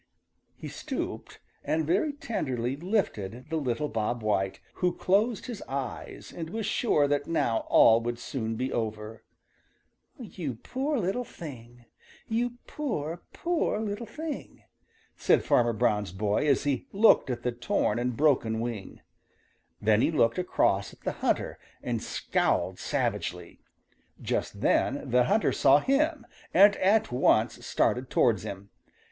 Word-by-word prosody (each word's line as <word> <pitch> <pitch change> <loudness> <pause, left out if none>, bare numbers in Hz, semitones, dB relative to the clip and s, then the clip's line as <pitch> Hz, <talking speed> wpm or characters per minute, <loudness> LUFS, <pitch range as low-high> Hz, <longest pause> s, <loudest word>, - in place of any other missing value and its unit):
He - - -8
stooped - - -5 0.2
and 160 0 0
very 195 - +1
tenderly 130 - -3
lifted 135 - -2
the 160 - 0
little 135 0 -1
Bob 115 -1 -2
White, 95 -3 0 0.2
who 180 -1 +2
closed 205 +3 +1
his 240 -4 -6
eyes 135 -2 -6
and 165 -2 -5
was 220 +3 -3
sure 200 -9 +2
that 145 0 0
now 115 -9 0
all 115 0 +6
would 120 0 -3
soon 115 -2 -4
be 130 +3 -2
over. 110 -1 -4 0.9
"You 175 - -5
poor 270 - -2
little 200 +4 -1
thing! 120 - -11 0.4
You 240 +2 -1
poor, 170 - -4
poor 340 -10 -1
little 220 +1 -4
thing!" 305 +5 -7 0.5
said - - +3
Farmer 120 -1 +3
Brown's 105 -4 0
boy 105 +8 0
as 140 -3 +3
he 140 -3 -1
looked 205 -8 +5
at 120 -1 -3
the 125 - 0
torn 120 0 0
and 125 -1 -2
broken 125 -7 +2
wing. 115 -4 -5 0.8
Then 105 +1 +3
he - - +3
looked 130 -4 +2
across 180 - +1
at - - -19
the - - -2
hunter - - 0 0.2
and - - -2
scowled - - 0
savagely. 90 -1 -3 0.6
Just - - -3
then 135 -1 +1
the 125 0 +4
hunter 210 - +2
saw 135 +1 +5
him 280 - +1 0.3
and 200 +3 +7
at 205 - +3
once 120 -2 +2
started 125 +1 0
towards 110 -6 +3
him. 100 -1 -8
135 Hz, 140 wpm, -28 LUFS, -, 0.9 s, and